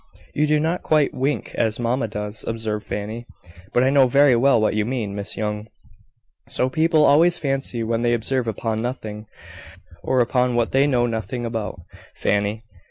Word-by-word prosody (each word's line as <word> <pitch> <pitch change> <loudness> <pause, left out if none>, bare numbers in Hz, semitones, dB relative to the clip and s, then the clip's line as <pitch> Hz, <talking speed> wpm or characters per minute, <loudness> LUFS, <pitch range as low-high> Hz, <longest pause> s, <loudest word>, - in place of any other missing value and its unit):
"You 150 +1 +1
do 150 0 +3
not 165 +4 -1
quite 155 -2 +2
wink 135 +3 -2
as 110 0 -1
mamma 120 0 0
does," 105 0 -5
observed 110 -2 -3
Fanny, 110 +4 -5 0.4
"but 120 - +3
I 130 - +3
know 135 -2 +5
very 140 0 +5
well 125 0 +4
what 110 - +1
you 105 0 +1
mean, 115 -4 -3
Miss 100 +1 -4
Young." 105 0 -3 0.8
"So 130 +1 -1
people 160 +1 +3
always 165 +5 +5
fancy 135 -5 -2
when 115 +1 -1
they 120 0 +2
observe 120 +2 -1
upon 110 0 -2
nothing, 110 -3 -5 0.7
or 130 - 0
upon 125 0 +1
what 120 -1 +1
they 135 +2 +3
know 125 -4 +2
nothing 120 +1 -3
about, 110 -6 -4 0.3
Fanny. 105 +2 -1
120 Hz, 170 wpm, -22 LUFS, 110-135 Hz, 0.8 s, know